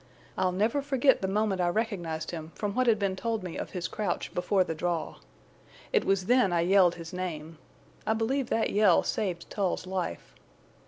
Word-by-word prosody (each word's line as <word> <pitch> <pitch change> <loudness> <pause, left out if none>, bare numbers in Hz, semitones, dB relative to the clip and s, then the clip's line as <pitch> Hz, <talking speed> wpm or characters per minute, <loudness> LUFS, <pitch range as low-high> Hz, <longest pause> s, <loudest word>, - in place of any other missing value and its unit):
I'll 185 - +1
never 215 +9 +1
forget 275 -1 +3
the 190 - 0
moment 200 -1 0
I 175 - +2
recognized 175 -6 -2
him 160 -1 -7
from 205 -1 -3
what 255 +2 +1
had 225 -2 +5
been 200 -2 -1
told 225 +1 -2
me 180 -2 -6
of - - -4
his 180 -2 -3
crouch 205 -5 -3
before 185 +2 +2
the 165 - -3
draw. 170 0 -2 0.8
It - - +3
was 195 -1 +1
then 245 -3 +4
I 170 -1 +2
yelled 180 0 +4
his 165 +1 -9
name. 165 -3 -5 0.5
I 220 - +3
believe 240 +4 -1
that 225 - +1
yell 205 -4 +4
saved 180 -5 -2
Tull's 195 -3 -1
life. 185 - -4
190 Hz, 190 wpm, -28 LUFS, 175-220 Hz, 0.8 s, had